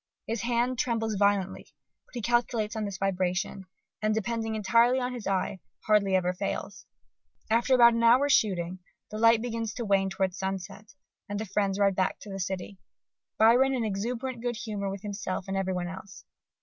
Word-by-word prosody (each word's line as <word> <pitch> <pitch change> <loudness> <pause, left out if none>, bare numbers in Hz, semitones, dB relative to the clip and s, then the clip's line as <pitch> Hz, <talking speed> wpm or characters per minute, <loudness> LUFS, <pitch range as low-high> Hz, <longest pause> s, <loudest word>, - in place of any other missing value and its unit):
His 225 0 -3
hand 240 +1 0
trembles 225 -2 0
violently, 200 -1 +1 0.4
but - - -19
he 240 - -4
calculates 235 -2 0
on 215 -1 -2
this 200 -1 -5
vibration, 190 0 -1 0.3
and, 215 0 +1
depending 225 +1 -2
entirely 235 +4 +3
on 250 0 -2
his 240 -5 -6
eye, 190 0 -1 0.3
hardly 205 -3 +3
ever 180 -1 +1
fails. 180 - -5 0.6
After 240 +3 +3
about 235 -1 +7
an 230 - 0
hour's 250 +5 +5
shooting, 185 -3 +1 0.3
the 215 - -5
light 230 0 +5
begins 230 -2 -3
to 240 - -4
wane 195 -1 +2
towards 190 -1 -2
sunset: 195 +2 -5 0.3
and 205 0 -3
the 220 - -3
friends 195 -1 0
ride 200 -1 +3
back 185 0 0
to 205 - -9
the 195 - -5
city, 190 +1 -4 0.6
Byron 245 +5 +5
in 245 - -1
exuberant 235 +5 -3
good 240 0 -2
humour 210 -2 -4
with 195 +1 -6
himself 200 -2 -4
and 195 - -3
everybody 185 -2 -1
else. 190 +1 -11
210 Hz, 175 wpm, -28 LUFS, 195-230 Hz, 0.6 s, about